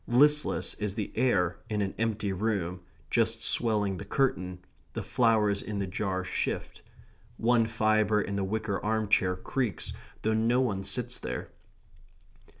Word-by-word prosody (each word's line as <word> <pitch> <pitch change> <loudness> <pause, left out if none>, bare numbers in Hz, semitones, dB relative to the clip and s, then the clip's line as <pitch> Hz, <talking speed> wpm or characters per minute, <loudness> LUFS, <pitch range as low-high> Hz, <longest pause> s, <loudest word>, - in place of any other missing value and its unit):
Listless 150 +5 +3
is 105 -2 -2
the 105 -3 -3
air 90 -9 +2
in 105 -1 -1
an 95 - -3
empty 110 -3 0
room, 95 -3 -1 0.3
just 115 -1 +2
swelling 105 -4 +1
the - - -6
curtain; 90 -6 -1 0.3
the - - -3
flowers 110 -5 +2
in 105 -1 -4
the 100 - 0
jar 95 0 -2
shift. - - -3 0.6
One 115 -1 +3
fibre 110 -2 +2
in 100 -1 -2
the 100 - 0
wicker 100 0 -2
arm 110 -1 0
chair 90 -2 +3
creaks, 115 +4 -2 0.3
though 110 - +2
no 115 +3 +3
one 105 -7 0
sits - - -1
there. - - -5
105 Hz, 150 wpm, -29 LUFS, 95-115 Hz, 0.6 s, Listless